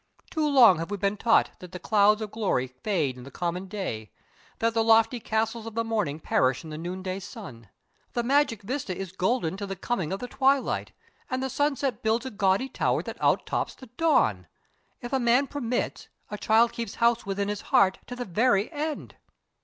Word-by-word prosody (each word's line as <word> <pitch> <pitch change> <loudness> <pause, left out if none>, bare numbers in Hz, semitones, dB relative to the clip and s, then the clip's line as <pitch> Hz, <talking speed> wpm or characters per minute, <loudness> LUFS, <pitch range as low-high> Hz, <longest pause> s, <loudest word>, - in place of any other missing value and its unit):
Too 305 -1 0
long 235 - +7
have 165 - -4
we 205 - -3
been 200 +1 0
taught 230 +2 +3
that 180 0 -11
the - - -4
clouds 210 +1 +3
of 210 - -6
glory 200 - 0
fade 135 +1 -2
in - - -10
the 135 - -10
common 175 +6 -3
day 180 - -5 0.5
that 230 0 +1
the 225 0 +2
lofty 225 +2 +4
castles 225 +1 -2
of 225 - -8
the 230 - +1
morning 210 -10 -1
perish 130 -3 +1
in 160 - -9
the 155 - -6
noon 180 +3 -5
day 185 0 -3
sun. 115 - -10 0.4
The 240 - 0
magic 255 -4 +2
vista 220 -5 -3
is 190 -2 -5
golden 190 -1 0
to 200 0 -5
the 195 - -4
coming 185 -4 -2
of 195 - -2
the 250 - -5
twilight, 270 +1 +1 0.4
and 260 -1 -2
the 265 - -2
sunset 275 -4 0
builds 225 +3 +1
a 260 - -4
gaudy 200 +4 +1
tower 265 - 0
that - - -8
out - - +2
tops - - -2
the 260 - -12
dawn. 245 - +2 0.5
If 240 +2 -7
a 265 - +3
man 245 +3 +3
permits, 250 -4 -3 0.2
a 210 - -3
child 230 +2 +4
keeps 235 -3 -5
house 235 -2 +2
within 200 0 -1
his 205 0 -3
heart 190 -1 +3
to 245 - -6
the 245 0 -4
very 210 - +2
end. 305 0 -4
215 Hz, 205 wpm, -27 LUFS, 185-245 Hz, 0.5 s, long